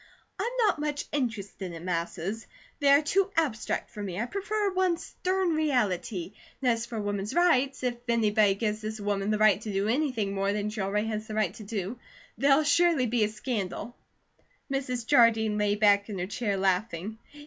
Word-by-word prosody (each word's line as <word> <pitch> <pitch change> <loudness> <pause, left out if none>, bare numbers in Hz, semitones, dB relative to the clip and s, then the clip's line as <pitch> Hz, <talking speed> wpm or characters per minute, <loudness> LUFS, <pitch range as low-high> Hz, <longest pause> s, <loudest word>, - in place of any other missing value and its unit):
I'm - - 0 0.2
not 405 -7 +2
much 295 -1 -2
interested 205 -9 -3
in 165 +1 -8
masses. 180 +4 -3 0.3
They 285 - +1
are 280 +2 +6
too 385 +6 +2
abstract 270 -10 -1
for 210 - -7
me; 190 -2 -4
I 230 - 0
prefer 400 - -1
one 370 -2 +2
stern 370 +1 -1
reality. 230 - 0 0.3
And 255 -2 +2
as 230 0 -2
for 230 -2 -4
Woman's 205 +2 -3
Rights, 275 -7 +3
if 245 -1 -1
anybody 215 -3 +3
gives 215 +1 -2
this 215 0 -5
woman 205 0 -1
the 215 - +2
right 215 -1 +4
to 215 - -5
do 195 +1 0
anything 235 -5 0
more 195 0 0
than 210 0 -2
she 215 -1 -4
already 205 +2 0
has 215 0 -4
the 215 - -5
right 210 -4 +1
to 215 - -10
do, 205 +2 -4 0.4
there'll 280 +2 +4
surely 305 -1 +3
be 235 -1 +1
a - - -2
scandal." 215 0 -4 0.8
Mrs. 250 -3 -2
Jardine 225 -5 +4
lay 205 0 +2
back 205 0 +4
in 205 - -4
her 180 - -2
chair 205 0 -2
laughing. 195 +2 -1
220 Hz, 185 wpm, -28 LUFS, 205-275 Hz, 0.8 s, are